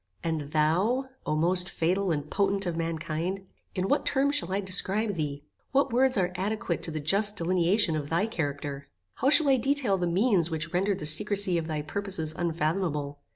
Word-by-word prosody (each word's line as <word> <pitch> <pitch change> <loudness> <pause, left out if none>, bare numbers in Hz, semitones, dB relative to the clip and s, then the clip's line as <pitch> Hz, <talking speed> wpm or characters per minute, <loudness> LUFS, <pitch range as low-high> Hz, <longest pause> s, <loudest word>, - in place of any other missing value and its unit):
And 155 -3 -3
thou, 185 - +1 0.2
O 155 - 0
most 180 +3 +1
fatal 185 +4 -1
and 145 -2 -3
potent 195 +3 0
of 175 -2 -3
mankind, 165 +3 -4 0.3
in 185 +1 -1
what 285 - +1
terms 280 +1 0
shall 285 -11 0
I 195 - 0
describe 200 +3 +1
thee? 145 -4 -4 0.3
What 275 -2 +1
words 260 0 +3
are 180 -2 0
adequate 190 -1 -3
to - - -4
the 155 -1 -4
just 200 +7 +2
delineation 175 +1 +1
of 145 -2 -4
thy 170 +5 +1
character? 145 -8 -5 0.3
How 270 - +1
shall 300 +1 +7
I 265 - +4
detail 255 -6 0
the 175 - -1
means 185 -1 +1
which 160 0 -4
rendered 195 +2 0
the 170 - -6
secrecy 185 +3 +5
of 160 - -6
thy 155 -2 -3
purposes 170 -2 -2
unfathomable? 155 -3 -2
180 Hz, 185 wpm, -27 LUFS, 160-205 Hz, 0.3 s, shall